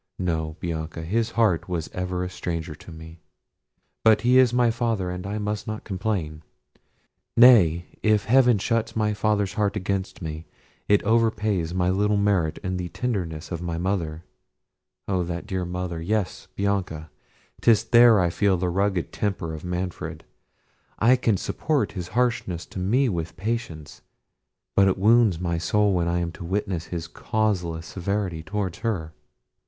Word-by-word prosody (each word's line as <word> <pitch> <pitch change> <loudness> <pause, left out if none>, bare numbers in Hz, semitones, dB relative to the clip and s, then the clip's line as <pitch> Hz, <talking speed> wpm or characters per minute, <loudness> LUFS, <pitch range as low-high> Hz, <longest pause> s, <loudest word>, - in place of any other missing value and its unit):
No, 80 -4 -2
Bianca; 80 -1 -4
his 110 +7 0
heart 100 -7 +2
was 85 -3 -2
ever 90 0 -2
a 90 - -3
stranger 85 -3 -4
to 80 - -13
me—but 80 +6 -3
he 125 +2 +5
is 130 -2 +5
my 120 -1 +3
father, 110 -6 -1
and 90 +1 -5
I 105 +2 -3
must 105 0 -3
not 110 0 -4
complain. 95 -6 -3 1.0
Nay, 95 -9 +7 0.2
if 110 -1 +2
Heaven 125 -1 +5
shuts 115 +3 -1
my 105 -1 +1
father's 105 -2 0
heart 105 -1 0
against 95 0 -3
me, 80 -1 -6 0.4
it 105 0 +4
overpays 105 -6 +1
my 90 0 +2
little 105 +2 +2
merit 100 -6 +1
in 95 -1 -2
the 90 -1 -4
tenderness 85 -7 -3
of 85 -1 -4
my 85 -1 -3
mother—O 90 +1 -5
that 85 +1 -4
dear 95 -4 -3
mother! 90 -1 -4
yes, 100 +2 -2
Bianca, 95 -6 -2 0.5
'tis 115 -3 +4
there 120 -2 +6
I 90 -2 +2
feel 100 0 +2
the 90 +1 -1
rugged 95 -1 0
temper 95 -6 -2
of 80 - -7
Manfred. 90 0 -4 0.7
I 120 +4 +5
can 115 -5 +1
support 150 - -1
his 90 -4 -5
harshness 120 -9 0
to - - -8
me 120 +9 +2
with 85 -6 -3
patience; 100 -9 -4 0.7
but 100 0 +5
it 95 - +2
wounds 110 -3 +4
my 85 -2 -1
soul 105 +5 +2
when 85 -2 +1
I 85 +1 0
am 85 -1 -3
witness 95 -1 -2
to - - -18
his 85 -2 -4
causeless 90 -8 -1
severity 95 -3 -3
towards 95 0 -3
her." 90 -9 -2
95 Hz, 155 wpm, -24 LUFS, 85-105 Hz, 1.0 s, Nay